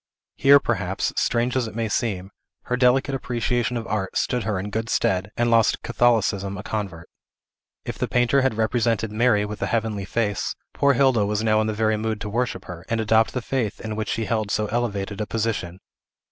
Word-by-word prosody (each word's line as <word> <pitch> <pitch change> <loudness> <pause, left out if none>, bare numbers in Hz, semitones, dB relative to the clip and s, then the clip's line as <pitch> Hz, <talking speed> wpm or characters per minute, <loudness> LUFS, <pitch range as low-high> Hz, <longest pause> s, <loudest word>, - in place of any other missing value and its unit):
Here, 140 +1 +7
perhaps, - - -1
strange 120 +2 +1
as 125 -3 +1
it 110 - -9
may 115 -1 -1
seem, 100 -4 -2 0.3
her 125 - -1
delicate 130 +2 +3
appreciation 120 -1 -1
of 115 - -4
art 100 -4 -2
stood 125 -2 0
her 105 -3 0
in 100 +2 -4
good 110 +1 -2
stead, 95 +1 +1
and 120 0 +2
lost 115 -1 +3
Catholicism 110 -4 +1
a 105 - -7
convert. 95 -6 -4 0.8
If - - -5
the - - 0
painter 125 +3 +3
had 130 -4 +1
represented 115 0 0
Mary 110 -1 +2
with 105 -1 -7
a - - 0
heavenly 110 -3 -1
face, 105 -1 -1 0.2
poor 140 0 +3
Hilda 130 -4 +3
was 105 +1 -1
now 110 -1 +3
in 110 - 0
the 110 - -1
very 110 0 +1
mood 110 0 -2
to 105 - -4
worship 115 -4 -2
her, 85 -2 -8
and 115 - 0
adopt 110 0 +3
the 125 - -3
faith 115 -6 -2
in 110 -1 -5
which 110 -1 -3
she 115 - -1
held 110 0 -1
so 110 +1 0
elevated 105 -3 -2
a 105 - -2
position. 105 -6 -2
110 Hz, 200 wpm, -23 LUFS, 105-120 Hz, 0.8 s, Here